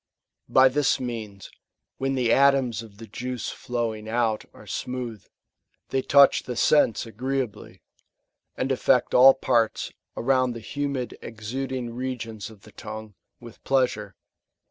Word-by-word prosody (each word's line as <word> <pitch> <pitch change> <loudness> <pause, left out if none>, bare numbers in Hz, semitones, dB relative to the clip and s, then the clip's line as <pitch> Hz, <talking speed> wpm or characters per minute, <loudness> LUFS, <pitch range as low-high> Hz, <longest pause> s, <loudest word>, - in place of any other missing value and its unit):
^ - - -64 0.5
By 130 0 +8
this 140 +2 +1
means, 110 -6 -6 0.5
when 135 0 0
the 120 -3 +2
atoms 135 -4 +3
of 110 -3 -13
the 115 - -9
juice 125 +3 -5
flowing 115 -3 -4
out 115 -2 0
are - - -15
smooth, 125 -5 -5 0.7
they 135 - 0
touch 140 +1 +6
the 125 - -6
sense 120 -3 +3
agreeably, 125 -1 -4 0.7
and 135 - -1
affect 130 -1 +2
all 130 +2 +8
parts^ 120 -4 0 0.2
around 130 0 +2
the 115 - -7
humid 140 +1 -3
exuding 120 +2 -5
regions 115 -4 -5
of 105 -3 -16
the 105 - -15
tongue, 110 0 -8 0.3
with 120 -2 -13
plea 135 -1 +3
sure. 105 -5 -8
120 Hz, 140 wpm, -25 LUFS, 110-130 Hz, 0.7 s, By